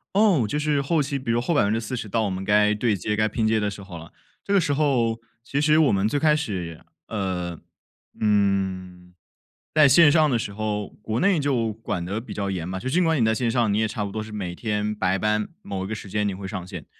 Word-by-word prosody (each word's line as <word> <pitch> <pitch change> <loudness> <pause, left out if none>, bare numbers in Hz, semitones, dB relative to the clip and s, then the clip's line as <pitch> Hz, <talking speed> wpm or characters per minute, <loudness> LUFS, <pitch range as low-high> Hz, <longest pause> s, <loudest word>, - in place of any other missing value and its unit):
哦， 200 - +4
就 150 - -1
是 150 -2 +1
后 155 +3 +1
期， 140 0 -1
比 130 -3 -4
如 115 +1 +2
后 165 +8 -1
40% 110 -1 0
到 110 +3 0
我 105 - -1
们 95 0 -4
该 105 +1 +3
对 105 0 +1
接、 105 +3 -2
该 110 +1 +2
拼 110 +1 -1
接 110 0 +2
的 105 -1 0
时 100 0 -9
候 95 -3 -10
了。 80 0 -11 0.3
这 200 - -3
个 200 - +5
时 145 -4 0
候 125 -6 +1 0.2
其 140 +3 -1
实 155 +1 +4
我 155 -4 +4
们 100 +1 +2
最 145 - 0
开 150 +1 +4
始， 95 - -4 0.3
呃， 90 -5 -3 0.6
嗯， 95 -4 0 0.6
在 155 -2 +7
线 145 +3 +7
上 155 0 +4
的 125 -5 +1
时 105 - -4
候， 105 0 -3 0.2
国 110 +2 -2
内 195 0 +3
就 130 -6 0
管 105 -5 -4
得 100 +5 -3
比 115 - -8
较 100 -1 -3
严 90 -3 -3
嘛。 95 +1 -4
就 125 - -6
是 - - -3
尽 180 - +4
管 160 -5 +2
你 - - +4
在 110 0 +2
线 120 0 0
上， 115 -3 +1
你 100 - +1
也 110 0 +2
差 110 -1 -4
不 100 - -4
多 110 +1 -4
是 110 - -10
每 95 -5 -5
天 105 0 -2
白 95 -1 0
班 105 +1 0
某 95 -1 -4
一 - - -5
个 110 - -4
时 105 -2 -7
间 105 +1 0
你 100 - -1
会 95 +1 -7
上 95 -3 -5
线。 90 -5 -8
110 Hz, 270 characters per minute, -24 LUFS, 100-130 Hz, 0.6 s, 在